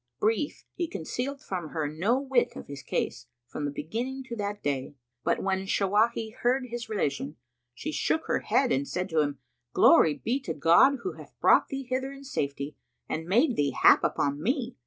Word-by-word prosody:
Brief, 225 Hz, +7 st, 0 dB
he 345 Hz, -, -2 dB
concealed 265 Hz, -, -4 dB
from 175 Hz, -5 st, -4 dB
her 155 Hz, -2 st, -2 dB
no 185 Hz, -, +1 dB
whit 265 Hz, -3 st, +1 dB
of -, -, -8 dB
his 140 Hz, 0 st, -8 dB
case, -, -, -3 dB, 0.2 s
from 145 Hz, +4 st, -5 dB
the 145 Hz, -, -2 dB
beginning 240 Hz, -, -4 dB
to 250 Hz, -3 st, -6 dB
that 205 Hz, -1 st, -4 dB
day. 140 Hz, 0 st, -2 dB, 0.3 s
But -, -, 0 dB
when 190 Hz, 0 st, -1 dB
Shawahi 220 Hz, +3 st, +1 dB
heard 255 Hz, +2 st, +1 dB
his 235 Hz, -1 st, -5 dB
relation, 145 Hz, -8 st, -2 dB, 0.4 s
she 310 Hz, -, -4 dB
shook 315 Hz, +1 st, 0 dB
her -, -, +1 dB
head 265 Hz, -2 st, +2 dB
and 140 Hz, +1 st, +1 dB
said 180 Hz, +1 st, -3 dB
to 160 Hz, -, +1 dB
him, 145 Hz, -2 st, 0 dB, 0.4 s
"Glory 155 Hz, -2 st, +6 dB
be 250 Hz, +4 st, -1 dB
to 275 Hz, -, -5 dB
God 170 Hz, -, +6 dB
who 380 Hz, -, -2 dB
hath -, -, -14 dB
brought -, -, +5 dB
thee 275 Hz, -1 st, -4 dB
hither 260 Hz, +1 st, -2 dB
in 275 Hz, 0 st, -11 dB
safety 140 Hz, -, -3 dB, 0.3 s
and 160 Hz, +1 st, -3 dB
made 240 Hz, -, +3 dB
thee 145 Hz, -1 st, 0 dB
hap -, -, +7 dB
upon 145 Hz, +1 st, 0 dB
me! 250 Hz, -, -1 dB
210 Hz, 190 wpm, -28 LUFS, -, 0.4 s, hap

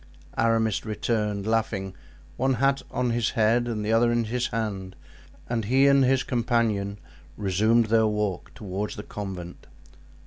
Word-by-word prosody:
Aramis 115 Hz, -2 st, +1 dB
returned, 105 Hz, -2 st, -1 dB
laughing, 110 Hz, -4 st, -1 dB, 0.4 s
one 130 Hz, +1 st, +1 dB
hat 135 Hz, +3 st, +2 dB
on 125 Hz, -1 st, -1 dB
his 115 Hz, -1 st, +1 dB
head 115 Hz, +2 st, +3 dB
and 110 Hz, -3 st, -3 dB
the 110 Hz, -, +1 dB
other 120 Hz, +1 st, +4 dB
in 120 Hz, 0 st, +1 dB
his 120 Hz, +2 st, -1 dB
hand; 100 Hz, -4 st, -4 dB, 0.5 s
and 115 Hz, -3 st, -1 dB
he 130 Hz, +5 st, +4 dB
and 140 Hz, -1 st, +5 dB
his 130 Hz, 0 st, +3 dB
companion 115 Hz, -5 st, 0 dB, 0.4 s
resumed 110 Hz, +4 st, +2 dB
their 110 Hz, 0 st, +4 dB
walk 105 Hz, -4 st, -2 dB
toward 100 Hz, 0 st, -4 dB
the 105 Hz, -, -7 dB
convent. 95 Hz, -5 st, -7 dB
110 Hz, 145 wpm, -26 LUFS, 105-120 Hz, 0.5 s, and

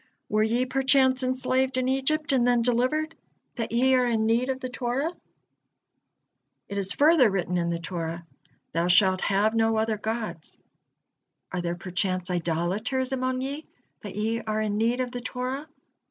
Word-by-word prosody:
Were 215 Hz, -, +2 dB
ye 235 Hz, +4 st, +1 dB
perchance 260 Hz, 0 st, +3 dB
enslaved 255 Hz, 0 st, 0 dB
in 255 Hz, 0 st, +1 dB
Egypt 280 Hz, +3 st, 0 dB
and 250 Hz, -3 st, +3 dB
then 240 Hz, -1 st, +3 dB
delivered, 255 Hz, +7 st, +1 dB, 0.4 s
that 230 Hz, -, -4 dB
ye 255 Hz, +3 st, +3 dB
are 250 Hz, -1 st, +3 dB
in 225 Hz, -2 st, +1 dB
need 235 Hz, +3 st, +1 dB
of 260 Hz, 0 st, -1 dB
the 255 Hz, -, -4 dB
Torah? 255 Hz, +5 st, -2 dB, 1.6 s
It 200 Hz, 0 st, -3 dB
is 195 Hz, -1 st, +1 dB
further 295 Hz, -5 st, +5 dB
written 180 Hz, -2 st, -1 dB
in 170 Hz, -1 st, 0 dB
the 170 Hz, -, -1 dB
Torah: 170 Hz, -1 st, -5 dB, 0.5 s
'Thou 170 Hz, +2 st, 0 dB
shalt 185 Hz, +1 st, +4 dB
have 205 Hz, +2 st, +2 dB
no 225 Hz, 0 st, +2 dB
other 220 Hz, 0 st, 0 dB
gods.' 220 Hz, -7 st, -4 dB, 0.9 s
Are 180 Hz, -, -2 dB
there 175 Hz, 0 st, -2 dB
perchance 185 Hz, 0 st, -2 dB
idolaters 180 Hz, -, -1 dB
among 255 Hz, -1 st, -1 dB
ye, 280 Hz, +4 st, -5 dB, 0.3 s
that 200 Hz, -3 st, -8 dB
ye 225 Hz, +2 st, -1 dB
are 215 Hz, -1 st, -2 dB
in 210 Hz, -1 st, -1 dB
need 235 Hz, +3 st, +1 dB
of 250 Hz, -1 st, -3 dB
the 245 Hz, -1 st, -5 dB
Torah? 255 Hz, +4 st, -4 dB
235 Hz, 165 wpm, -26 LUFS, 195-260 Hz, 1.6 s, further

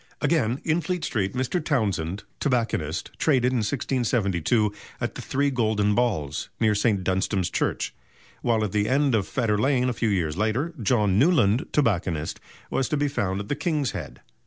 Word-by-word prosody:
Again, 130 Hz, -6 st, +1 dB
in 160 Hz, +2 st, +1 dB
Fleet 180 Hz, +2 st, -2 dB
Street, 100 Hz, -3 st, -1 dB
Mr. 130 Hz, +7 st, -1 dB
Townsend, 100 Hz, -, -1 dB, 0.2 s
tobacconist, 115 Hz, -, -1 dB
traded 130 Hz, -5 st, +3 dB
in 130 Hz, -, +1 dB
1672 110 Hz, -, 0 dB, 0.3 s
at -, -, -2 dB
the -, -, -7 dB
"Three 140 Hz, +1 st, 0 dB
Golden 110 Hz, -4 st, +1 dB
Balls," 100 Hz, -, -1 dB
near 110 Hz, -2 st, +3 dB
St. 105 Hz, -2 st, +1 dB
Dunstan's 95 Hz, 0 st, 0 dB
Church; -, -, -1 dB, 0.5 s
while 115 Hz, -2 st, +1 dB
at 105 Hz, -, -2 dB
the 105 Hz, +1 st, +1 dB
end 140 Hz, 0 st, +2 dB
of 105 Hz, -4 st, +1 dB
Fetter 110 Hz, -5 st, 0 dB
Lane, 130 Hz, 0 st, +2 dB
a -, -, -1 dB
few 115 Hz, -1 st, 0 dB
years 85 Hz, -7 st, 0 dB
later, 115 Hz, -, 0 dB
John 105 Hz, -3 st, +2 dB
Newland, 135 Hz, -, +3 dB
tobacconist, 90 Hz, -, 0 dB, 0.3 s
was 135 Hz, -, 0 dB
to 150 Hz, -, 0 dB
be 145 Hz, 0 st, +1 dB
found 100 Hz, -8 st, -1 dB
at 100 Hz, -, -8 dB
the 145 Hz, -, -1 dB
"King's 150 Hz, -3 st, 0 dB
Head." 90 Hz, -7 st, -7 dB
115 Hz, 170 wpm, -25 LUFS, 100-135 Hz, 0.5 s, traded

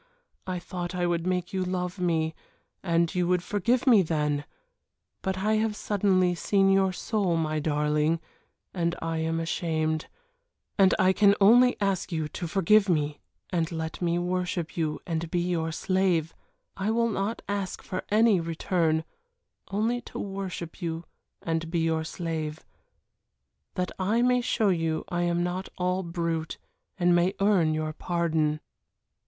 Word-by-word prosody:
I 185 Hz, -1 st, -2 dB
thought 175 Hz, 0 st, -5 dB
I 180 Hz, -1 st, 0 dB
would 170 Hz, 0 st, 0 dB
make 180 Hz, +1 st, -1 dB
you 190 Hz, -1 st, 0 dB
love 180 Hz, 0 st, -3 dB
me, 160 Hz, -3 st, +1 dB, 0.5 s
and 170 Hz, -2 st, +1 dB
you 180 Hz, -1 st, +1 dB
would 180 Hz, -1 st, +1 dB
forgive 230 Hz, +7 st, +1 dB
me 235 Hz, -7 st, +7 dB
then. 150 Hz, -3 st, -1 dB, 0.8 s
But 190 Hz, 0 st, -2 dB
I 215 Hz, +3 st, +1 dB
have 220 Hz, -1 st, 0 dB
suddenly 190 Hz, -4 st, +2 dB
seen 195 Hz, +2 st, +2 dB
your 195 Hz, -1 st, +3 dB
soul, 185 Hz, -2 st, 0 dB
my 155 Hz, -1 st, 0 dB
darling, 150 Hz, +1 st, +1 dB, 0.5 s
and 170 Hz, -2 st, 0 dB
I 165 Hz, 0 st, -2 dB
am 160 Hz, +1 st, -1 dB
ashamed, 160 Hz, -1 st, -1 dB, 0.7 s
and 190 Hz, -1 st, +5 dB
I 185 Hz, 0 st, +4 dB
can 200 Hz, 0 st, +5 dB
only 245 Hz, +5 st, +6 dB
ask 195 Hz, -2 st, 0 dB
you 160 Hz, -2 st, -1 dB
to 175 Hz, -, -5 dB
forgive 195 Hz, +4 st, +4 dB
me 150 Hz, -3 st, 0 dB, 0.3 s
and 170 Hz, -2 st, 0 dB
let 160 Hz, +1 st, -4 dB
me 170 Hz, -1 st, +1 dB
worship 180 Hz, -1 st, -2 dB
you 155 Hz, -3 st, -1 dB
and 165 Hz, -1 st, -3 dB
be 175 Hz, -, 0 dB
your 170 Hz, -2 st, -1 dB
slave 175 Hz, -2 st, +1 dB, 0.4 s
I 195 Hz, +2 st, -2 dB
will 230 Hz, +1 st, +2 dB
not 205 Hz, +3 st, -2 dB
ask 200 Hz, -2 st, -3 dB
for 185 Hz, -, -4 dB
any 215 Hz, -2 st, +4 dB
return 165 Hz, -1 st, 0 dB, 0.6 s
only 225 Hz, +4 st, 0 dB
to -, -, -10 dB
worship 195 Hz, -3 st, -5 dB
you 165 Hz, 0 st, -3 dB, 0.4 s
and 165 Hz, 0 st, -2 dB
be 170 Hz, -, -1 dB
your 160 Hz, -1 st, +1 dB
slave 160 Hz, -2 st, -4 dB, 1.1 s
that 180 Hz, 0 st, -1 dB
I 215 Hz, +6 st, +2 dB
may 250 Hz, 0 st, +3 dB
show 225 Hz, -3 st, +1 dB
you 165 Hz, -3 st, 0 dB
I 175 Hz, -1 st, -1 dB
am 175 Hz, 0 st, +1 dB
not 180 Hz, +2 st, -3 dB
all 180 Hz, +1 st, 0 dB
brute 170 Hz, -2 st, -3 dB, 0.4 s
and 175 Hz, -1 st, +3 dB
may 175 Hz, +3 st, +2 dB
earn 190 Hz, -6 st, +3 dB
your 155 Hz, 0 st, -2 dB
pardon." 160 Hz, -2 st, 0 dB
175 Hz, 155 wpm, -27 LUFS, 165-195 Hz, 1.1 s, me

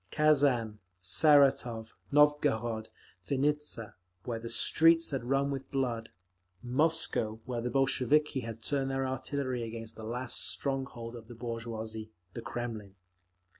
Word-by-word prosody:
Kazan, 135 Hz, -8 st, +3 dB, 0.2 s
Saratov, 125 Hz, -, +4 dB, 0.2 s
Novgorod, 140 Hz, -7 st, +2 dB, 0.4 s
Vinnitza—where 115 Hz, -8 st, -3 dB
the 115 Hz, +1 st, -6 dB
streets 165 Hz, +8 st, +4 dB
had 135 Hz, -3 st, -2 dB
run 135 Hz, +3 st, +1 dB
with 135 Hz, -1 st, -5 dB
blood; 120 Hz, -4 st, -2 dB, 0.5 s
Moscow, 125 Hz, -5 st, +1 dB
where 120 Hz, -2 st, -3 dB
the 125 Hz, -, -2 dB
Bolsheviki 135 Hz, +2 st, +2 dB
had 115 Hz, -2 st, -7 dB
turned 135 Hz, +1 st, 0 dB
their 135 Hz, 0 st, -1 dB
artillery 130 Hz, -1 st, -2 dB
against 115 Hz, -1 st, -6 dB
the 110 Hz, -, -9 dB
last 120 Hz, +3 st, -3 dB
strong 135 Hz, -1 st, -1 dB
hold 115 Hz, -2 st, -8 dB
of 115 Hz, -2 st, -10 dB
the 120 Hz, -, -10 dB
bourgeoisie—the 110 Hz, -4 st, -6 dB
Kremlin. 115 Hz, -5 st, -5 dB
120 Hz, 120 wpm, -31 LUFS, 115-140 Hz, 0.5 s, Saratov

